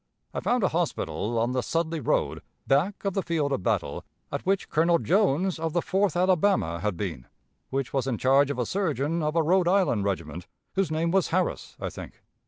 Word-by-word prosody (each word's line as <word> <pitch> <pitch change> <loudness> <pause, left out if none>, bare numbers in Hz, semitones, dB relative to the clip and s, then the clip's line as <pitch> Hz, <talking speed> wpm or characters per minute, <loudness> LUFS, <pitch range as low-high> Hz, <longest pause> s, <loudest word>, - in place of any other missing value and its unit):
I - - -2
found 245 -2 +1
a 190 - +3
hospital 150 -8 -2
on 115 +2 +1
the 125 0 0
Sudley 165 +3 -1
road, 130 - 0 0.2
back 170 +10 +1
of 195 - 0
the 195 - 0
field 160 -5 -1
of 135 - -1
battle, - - -1 0.3
at - - -3
which 195 0 +1
Colonel 170 +2 +3
Jones, 185 -1 +1
of 160 -1 -2
the 175 - +2
Fourth 190 -2 +1
Alabama, 180 - +2
had 100 -1 -2
been, 85 -10 -4 0.4
which 135 -1 -2
was 135 -2 0
in 125 -4 -1
charge 135 +3 +4
of 140 - -2
a 125 - 0
surgeon 165 - -1
of 155 +1 -1
a 165 - +3
Rhode 180 +2 +3
Island 180 - +2
regiment, 85 -3 -3 0.3
whose 195 -3 +1
name 160 +2 0
was 190 -1 +2
Harris, 185 +2 -2
I - - -4
think. - - -10
160 Hz, 200 wpm, -26 LUFS, 130-185 Hz, 0.4 s, charge